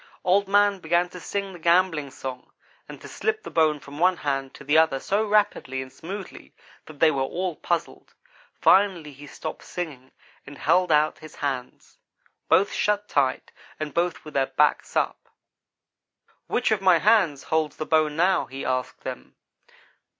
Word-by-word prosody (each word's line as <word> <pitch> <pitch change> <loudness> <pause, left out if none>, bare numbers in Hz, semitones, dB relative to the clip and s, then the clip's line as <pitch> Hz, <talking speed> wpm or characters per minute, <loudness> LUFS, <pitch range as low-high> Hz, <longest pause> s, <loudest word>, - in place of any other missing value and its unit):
"Old 195 +2 +3
man 205 0 +3
began 175 +1 +1
to 180 - -10
sing 200 +2 -4
the 175 - -11
gambling 170 -3 +2
song 130 -1 -8 0.4
and - - -9
to - - -10
slip 435 0 -2
the - - -8
bone 155 -2 +2
from 140 +1 -11
one 180 +1 +3
hand 135 -3 -2
to - - -12
the 145 +2 +1
other 160 -4 +4
so 205 +8 0
rapidly 205 -10 +1
and 130 0 -7
smoothly 190 +5 -9 0.3
that 155 -2 -13
they 160 -1 +5
were 135 -3 -1
all 175 +5 -2
puzzled. - - -3 0.4
Finally 185 -7 +3
he 145 +2 -12
stopped 155 +2 -7
singing 145 -7 -7 0.4
and 140 0 -10
held 180 +3 +2
out 150 0 +3
his 155 - -12
hands 135 -3 -5 0.5
both 200 +2 +4
shut 210 0 0
tight, 135 -2 0 0.3
and 155 -1 -4
both 170 -3 -1
with 155 - -10
their 135 -1 +1
backs 145 +3 +1
up. - - -1 1.2
"'Which 245 - 0
of 215 -3 +1
my 185 -3 +5
hands 185 -7 +3
holds 160 -1 -1
the 155 - -4
bone 155 -2 +2
now?' 180 +4 +2
he 135 +1 -7
asked 130 0 -2
them. - - -8
160 Hz, 170 wpm, -25 LUFS, 140-185 Hz, 1.2 s, they